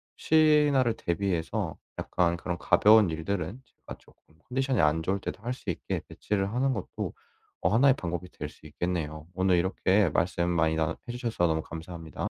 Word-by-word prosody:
혹시나를 150 -6 +4
대비해서 85 -3 -2 0.2
약간 85 -1 +1
그런 85 0 -4
가벼운 105 +2 +5
일들은 90 +6 -3
제가 - - -12
쪼끔 80 0 -25
컨디션이 130 -1 +1
안 75 +2 +2
좋을 95 +4 0
때도 100 - -6
할 120 +2 -2
수 125 - -8
있게 90 - -3
배치를 100 -1 -2
하는 130 +2 +1
것도 105 -6 -5 0.5
어 90 - +3
1 120 +8 +5
의 - - +7
방법이 90 -3 -4
될 - - -6
수 - - -19
있겠네요. 80 -3 -3
오늘 95 -1 +3
이렇게 95 +2 +2
말씀 85 +2 0
많이 80 -2 +2
나눠 80 -1 0
해 - - -3
주셔서 115 -7 -1
너무 80 -1 0
감사합니다. 80 +1 -7
90 Hz, 365 characters per minute, -28 LUFS, 85-115 Hz, 0.5 s, 의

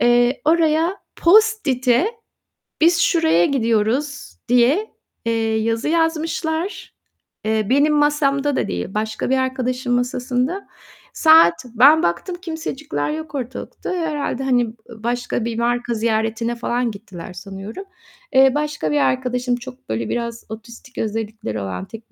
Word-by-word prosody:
Eee, 240 +1 +3
oraya 325 +3 +2 0.2
post-it'e 335 - +3 0.8
biz 340 +1 +5
şuraya 325 - +3
gidiyoruz 245 +3 0
diye, 260 - +3 0.3
eee, 225 -1 0
yazı 225 +5 -1
yazmışlar. 325 +2 -1 0.5
Eee, 215 -1 0
benim 285 +3 +4
masamda 290 -1 +2
da - - 0
değil, 90 0 -3
başka 215 +2 -2
bir 265 - +3
arkadaşın 255 -1 -1
masasında. 250 +7 -1 0.5
Saat, 315 - +5
ben 290 +7 +6
baktım 170 - -1
kimsecikler 305 - -4
yok 315 -1 -6
ortalıkta. 255 -2 -6
Herhâlde, 305 -6 -2
hani, 250 -2 +2
ı 220 0 -14
başka 240 -1 -2
bir 230 -1 -3
marka 240 0 0
ziyaretine 225 +1 -1
falan 240 0 -1
gittiler 195 -4 -10
sanıyorum. 195 - -8 0.5
Eee, 265 0 +6
başka 295 - -1
bir 150 - +2
arkadaşım 245 - 0
çok 125 - -11
böyle 110 0 -2
biraz 235 -1 -3
otistik 235 +3 -11
özellikleri 215 - -3
olan, 95 -1 -5
tek 225 - -12
245 Hz, 125 wpm, -20 LUFS, 220-295 Hz, 0.8 s, ben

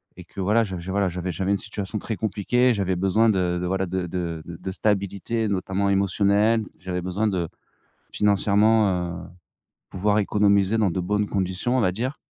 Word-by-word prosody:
et 90 - -11
que 100 - -12
voilà, 105 +5 +3
j 95 -4 -5
j 85 +2 -6
voilà 100 0 +1
j'avais 90 +1 -4
j'avais 95 +4 -1
une 100 - +2
situation 100 +1 -5
très 110 +2 -4
compliquée. 120 +4 +1
J'avais 95 -3 -1
besoin 95 +5 +2
de 90 -4 +1
de - - -2
voilà, 95 +1 0
de 95 0 -2
de 85 -2 -4
de 85 -1 -8
de 95 +2 -5
stabilité, 100 +3 -1
notamment 100 0 -1
émotionnelle. 100 +3 +2
J'avais 90 -1 -4
besoin 95 +5 -1
de 90 -5 -1 0.6
financièrement 100 -4 +2
heu, - - -13 0.6
pouvoir 105 +3 +1
économiser 100 0 +2
dans 105 -4 +2
de 90 - -2
bonnes 105 +3 0
conditions, 95 +5 -1
on - - +3
va 90 -5 +2
dire. 125 +8 -3
100 Hz, 185 wpm, -24 LUFS, 90-105 Hz, 0.6 s, voilà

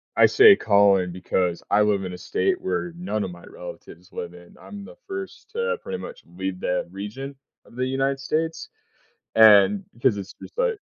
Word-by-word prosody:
I - - +6
say 420 -1 +8
calling 100 -3 +3
because 90 -1 -1
I 105 +1 +4
live 105 -2 +2
in 90 - -5
a 90 - -7
state 370 - -1
where 175 - -3
none 110 - -3
of 95 - -5
my 85 0 -13
relatives 90 +2 -11
live 85 0 -6
in. 90 0 -16
I'm 200 -1 -10
the - - -13
first 380 -1 -7
to 470 +1 -1
pretty 235 - -5
much - - -9
leave 90 +2 -5
that 90 -1 -1
region 105 +9 -7 0.3
of - - -18
the 125 +1 -1
United 135 +1 -1
States, 160 +4 -2 0.7
and 110 - +6
because 120 -2 +1
it's 95 -1 -7
just, - - -14
like 480 -4 +1
110 Hz, 185 wpm, -24 LUFS, -, 0.7 s, say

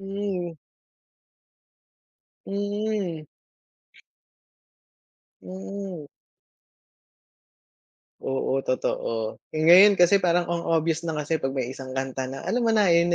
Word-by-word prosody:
hmm. 195 -3 -4 1.9
Mm. 205 -5 -3 2.2
Mm. 190 -4 -7 2.1
Oo, 135 0 -1
totoo 115 -3 -2 0.2
yung 155 +2 +3
ngayon 200 +3 +9
kasi 180 +2 +5
parang 175 -2 +2
ang 170 -1 -2
obvious 165 0 0
na 160 - -2
kasi 150 +1 -1
pag 135 0 -3
may 130 -2 -2
isang 130 -1 -8
kanta 130 0 -3
na 135 +1 -7
alam 240 -1 0
mo 225 - +3
na 205 -4 +4
yun, 170 +1 +4
170 Hz, 100 wpm, -25 LUFS, 140-195 Hz, 2.2 s, ngayon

